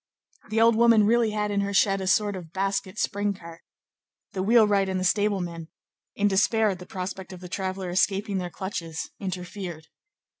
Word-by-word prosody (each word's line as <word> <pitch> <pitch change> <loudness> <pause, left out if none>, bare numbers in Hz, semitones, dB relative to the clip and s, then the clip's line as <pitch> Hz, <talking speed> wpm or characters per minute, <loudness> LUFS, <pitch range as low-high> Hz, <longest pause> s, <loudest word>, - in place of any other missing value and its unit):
The 220 +1 0
old 230 0 +5
woman 230 -2 +5
really 230 +1 +3
had 210 -1 -1
in 200 0 +1
her 200 0 -2
shed 195 0 +3
a 190 - -3
sort 205 +1 +2
of 170 -4 -9
basket 195 +1 -2
spring 205 +1 -1
cart. 170 -2 -12 0.7
The 190 - -3
wheelwright 205 -2 +4
and 190 0 -1
the - - -2
stable 205 +1 +2
man, 170 -2 -6 0.5
in 205 - +2
despair 210 +2 +3
at 185 - -6
the 180 - -11
prospect 190 0 -6
of 185 - -9
the 180 - -9
traveller 185 0 -3
escaping 195 +2 +1
their 180 -1 -4
clutches, 170 -4 -5
interfered. 180 -3 -6
195 Hz, 185 wpm, -26 LUFS, 185-210 Hz, 0.7 s, old